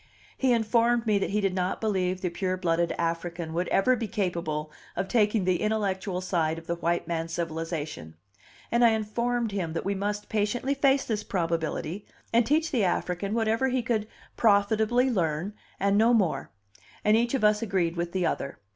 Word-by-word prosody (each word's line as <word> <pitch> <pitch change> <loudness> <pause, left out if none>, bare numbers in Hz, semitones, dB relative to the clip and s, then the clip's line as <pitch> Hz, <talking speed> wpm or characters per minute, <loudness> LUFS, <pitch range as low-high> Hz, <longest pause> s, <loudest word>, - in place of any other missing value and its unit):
He 260 -1 +2
informed 235 +1 +2
me 210 -2 +3
that - - -1
he 210 +1 0
did 195 -2 +1
not 185 0 -1
believe 185 -4 0
the 180 - -1
pure 185 +1 -2
blooded 170 -2 +1
African 170 0 -3
would 175 +2 -1
ever 255 +6 +3
be 230 -2 -3
capable 170 -8 -2 0.2
of 190 - -2
taking 210 -3 +2
the 180 -1 +1
intellectual 200 -3 -1
side 165 -4 0
of 165 - -9
the 170 - -1
white 170 0 -1
man's 165 -1 -3
civilization, 160 - -4 0.6
and 235 +1 +3
I 230 -1 +6
informed 235 +2 -1
him 180 -5 -2
that 165 - -3
we 200 - +1
must 205 +1 -3
patiently 220 +5 0
face 275 0 +2
this 215 -2 -2
probability, 165 +1 -2 0.3
and 230 0 +4
teach 315 +2 +2
the 240 -6 +2
African 180 +2 -1
whatever 225 +3 +1
he 255 -1 0
could 220 -3 -1 0.3
profitably 220 +4 +3
learn 175 -1 -1 0.3
and 200 +1 +3
no 235 +2 +5
more; 195 -7 0 0.6
and 210 +1 +5
each 235 +3 +2
of 260 - -1
us 210 0 +4
agreed 185 -6 0
with 170 0 -2
the 185 -1 0
other. 140 -3 -2
200 Hz, 180 wpm, -27 LUFS, 170-225 Hz, 0.6 s, I